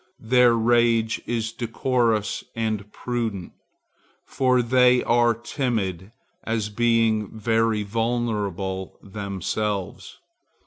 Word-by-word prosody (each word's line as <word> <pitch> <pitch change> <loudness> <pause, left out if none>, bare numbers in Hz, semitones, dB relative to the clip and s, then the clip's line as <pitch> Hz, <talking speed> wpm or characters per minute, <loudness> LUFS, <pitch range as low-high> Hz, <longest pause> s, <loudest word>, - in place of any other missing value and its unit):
Their 120 0 +4
rage 115 -1 +2
is 115 -2 -2
decorous 115 -2 0
and 110 -3 -2
prudent, 115 -7 -4 0.7
for 125 -2 +2
they 125 +1 +4
are 120 0 +3
timid, 110 - -3 0.3
as 110 -2 -2
being 110 -1 +1
very 115 -1 +1
vulnerable 105 -4 -2
themselves. 100 0 -4
115 Hz, 85 wpm, -24 LUFS, 105-120 Hz, 0.7 s, Their